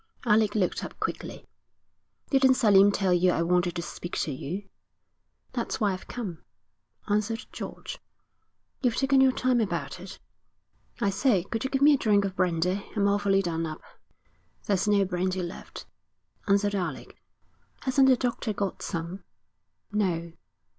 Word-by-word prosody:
Alec 215 Hz, -2 st, +3 dB
looked 190 Hz, -4 st, 0 dB
up -, -, -8 dB
quickly. -, -, -4 dB, 0.9 s
'Didn't 265 Hz, -1 st, +5 dB
Selim 205 Hz, -5 st, +6 dB
tell 195 Hz, -2 st, +1 dB
you 180 Hz, +1 st, +4 dB
I 170 Hz, -, +1 dB
wanted 175 Hz, 0 st, +1 dB
to 170 Hz, -, -3 dB
speak 175 Hz, 0 st, -6 dB
to 155 Hz, -, -2 dB
you?' 175 Hz, +9 st, -5 dB, 0.9 s
'That's 240 Hz, -2 st, -2 dB
why 205 Hz, -3 st, +2 dB
I've 185 Hz, -, -8 dB
come,' 195 Hz, -10 st, -6 dB, 0.7 s
answered 215 Hz, +3 st, 0 dB
George. -, -, -7 dB, 0.8 s
'You've 245 Hz, -3 st, +1 dB
taken 270 Hz, 0 st, +3 dB
your 265 Hz, 0 st, +6 dB
time 250 Hz, -1 st, +1 dB
about 215 Hz, -, -3 dB
it.' -, -, -9 dB, 0.8 s
'I 200 Hz, -, +3 dB
say, 195 Hz, -2 st, +2 dB
could 225 Hz, +3 st, -4 dB
you -, -, -1 dB
give 270 Hz, 0 st, 0 dB
me 295 Hz, +1 st, +8 dB
a -, -, +4 dB
drink 205 Hz, -2 st, +3 dB
of 190 Hz, -1 st, -4 dB
brandy? 180 Hz, +2 st, 0 dB
I'm 200 Hz, -1 st, +2 dB
awfully 200 Hz, -1 st, +2 dB
done 165 Hz, -2 st, -2 dB
up.' 155 Hz, 0 st, -8 dB, 0.8 s
'There's 200 Hz, -1 st, +1 dB
no 205 Hz, -1 st, +4 dB
brandy 185 Hz, 0 st, -1 dB
left,' 175 Hz, +2 st, -8 dB, 0.6 s
answered 200 Hz, 0 st, +2 dB
Alec. 190 Hz, -3 st, -4 dB, 0.7 s
'Hasn't 265 Hz, 0 st, +4 dB
the 255 Hz, -, +5 dB
doctor 240 Hz, -3 st, -2 dB
got 200 Hz, -1 st, -3 dB
some?' 170 Hz, +2 st, -5 dB, 0.7 s
'No.' 175 Hz, -5 st, -1 dB
200 Hz, 150 wpm, -27 LUFS, 180-225 Hz, 0.9 s, me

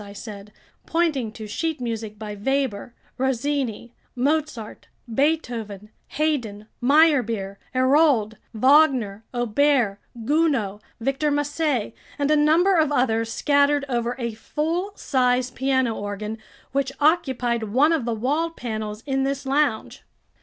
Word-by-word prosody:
I 200 Hz, 0 st, -11 dB
said, 205 Hz, -1 st, -9 dB, 0.4 s
pointing 310 Hz, -9 st, 0 dB
to 220 Hz, -1 st, -8 dB
sheet 315 Hz, +9 st, -3 dB
music 225 Hz, -3 st, -4 dB
by 210 Hz, 0 st, -6 dB
Weber, 240 Hz, 0 st, -2 dB, 0.2 s
Rossini, 260 Hz, -2 st, -1 dB, 0.2 s
Mozart, 275 Hz, -4 st, -2 dB, 0.2 s
Beethoven, 230 Hz, -6 st, -1 dB, 0.3 s
Haydn, 245 Hz, -10 st, -1 dB, 0.2 s
Meyerbeer, 245 Hz, -9 st, +3 dB, 0.2 s
Hérold, 260 Hz, -4 st, +3 dB, 0.2 s
Wagner, 255 Hz, -4 st, +3 dB
Auber, 240 Hz, -3 st, +1 dB, 0.3 s
Gounod, 265 Hz, -9 st, +1 dB, 0.2 s
Victor 275 Hz, +5 st, 0 dB
Massé, 290 Hz, -5 st, -1 dB, 0.2 s
and 285 Hz, +1 st, +1 dB
a -, -, +5 dB
number 330 Hz, +6 st, +4 dB
of 310 Hz, -2 st, +3 dB
others 230 Hz, -4 st, +1 dB
scattered 285 Hz, +1 st, +2 dB
over 240 Hz, -2 st, -1 dB
a 235 Hz, -3 st, -3 dB
full 325 Hz, -, -2 dB
size 250 Hz, -4 st, +1 dB
piano 260 Hz, -2 st, +1 dB
organ, 210 Hz, +1 st, -5 dB, 0.3 s
which 275 Hz, -1 st, 0 dB
occupied 260 Hz, -7 st, +1 dB
one 285 Hz, +9 st, +4 dB
of 315 Hz, -6 st, 0 dB
the 235 Hz, -1 st, -1 dB
wall 290 Hz, +9 st, 0 dB
panels 220 Hz, -7 st, -5 dB
in 270 Hz, -1 st, 0 dB
this 275 Hz, +1 st, -2 dB
lounge. 270 Hz, -4 st, 0 dB
255 Hz, 120 wpm, -23 LUFS, 220-290 Hz, 0.4 s, a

